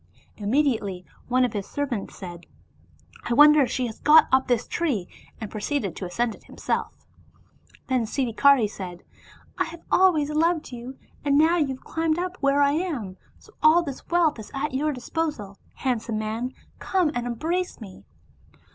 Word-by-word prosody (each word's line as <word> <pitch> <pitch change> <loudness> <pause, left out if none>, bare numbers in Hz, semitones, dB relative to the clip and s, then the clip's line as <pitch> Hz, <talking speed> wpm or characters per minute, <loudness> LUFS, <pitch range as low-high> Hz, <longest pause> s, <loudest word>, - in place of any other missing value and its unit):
Immediately 210 -5 0 0.2
one 255 +1 +3
of 245 - -3
his 200 -2 -4
servants 260 -8 -4
said, 175 -2 -9 0.4
" - - -25
I 235 - +1
wonder 300 +2 +8
whether 270 - +3
she 255 - -1
has 225 -2 -7
got 310 +2 +6
up 260 0 +3
this 245 -2 +1
tree," 270 - -1 0.3
and 220 -3 -6
proceeded 210 - -2
to 185 - -5
ascend 230 +5 -1
it - - -17
himself. - - -4 0.8
Then 255 -3 0
Siddhikari 255 0 +3
said, 185 -3 -8 0.3
" - - -26
I 370 - +2
have 330 0 -10
always 320 -6 +4
loved 320 0 +1
you, 245 +2 -8 0.3
and 285 -1 +3
now 325 +3 +4
you 300 -4 +2
have 265 -1 -6
climbed 325 -1 -1
up 360 +1 -3
where 280 0 +3
I 280 - +4
am, 285 - -3 0.2
so 430 - -20
all 320 +3 +6
this 280 -5 -7
wealth 335 -7 +2
is 215 - -9
at 275 +1 -2
your 300 +3 0
disposal, 250 -6 -4 0.2
handsome 235 -3 -2
man, 225 +4 -3 0.2
come 365 -5 +1
and 245 -2 -3
embrace 335 +10 -2
me." 195 - -11
265 Hz, 175 wpm, -25 LUFS, 220-310 Hz, 0.8 s, wonder